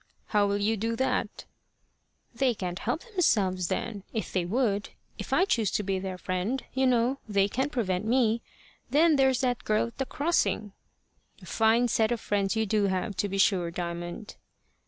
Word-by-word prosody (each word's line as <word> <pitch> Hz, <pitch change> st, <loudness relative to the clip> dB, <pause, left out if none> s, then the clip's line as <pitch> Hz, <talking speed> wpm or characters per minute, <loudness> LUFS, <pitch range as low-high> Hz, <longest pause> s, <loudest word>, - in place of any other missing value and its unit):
"How 205 Hz, -2 st, +3 dB
will 200 Hz, 0 st, 0 dB
you 215 Hz, +2 st, +1 dB
do 225 Hz, +3 st, -1 dB
that?" 260 Hz, +3 st, -1 dB, 0.9 s
"They 250 Hz, 0 st, +1 dB
can't 180 Hz, -2 st, -4 dB
help 245 Hz, +9 st, -2 dB
themselves 205 Hz, -, +1 dB
then, 210 Hz, +2 st, -3 dB
if 220 Hz, -, -4 dB
they 185 Hz, -2 st, 0 dB
would. 205 Hz, 0 st, 0 dB, 0.3 s
If -, -, -6 dB
I 370 Hz, -, +4 dB
choose 225 Hz, -, +1 dB
to 210 Hz, -, 0 dB
be 190 Hz, -1 st, -1 dB
their 185 Hz, -1 st, -5 dB
friend, 185 Hz, +9 st, -2 dB
you 265 Hz, 0 st, +2 dB
know, 250 Hz, +2 st, +2 dB
they 200 Hz, -1 st, +3 dB
can't 265 Hz, +7 st, -2 dB
prevent 190 Hz, -7 st, -1 dB
me. 230 Hz, -1 st, +2 dB, 0.5 s
Then 315 Hz, +2 st, +4 dB
there's 265 Hz, -2 st, +3 dB
that 245 Hz, -2 st, 0 dB
girl 215 Hz, +1 st, +1 dB
at 230 Hz, -, -22 dB
the 270 Hz, -, -1 dB
crossing." 285 Hz, -, 0 dB, 0.7 s
"A -, -, -10 dB
fine 225 Hz, +2 st, +3 dB
set 220 Hz, -1 st, +1 dB
of 240 Hz, -, 0 dB
friends 200 Hz, -1 st, 0 dB
you 220 Hz, 0 st, +1 dB
do 210 Hz, 0 st, +1 dB
have, 190 Hz, +1 st, -1 dB
to 205 Hz, -, 0 dB
be 195 Hz, -, -3 dB
sure, 190 Hz, -3 st, +3 dB
Diamond!" 175 Hz, +4 st, -6 dB
215 Hz, 180 wpm, -28 LUFS, 195-245 Hz, 0.9 s, I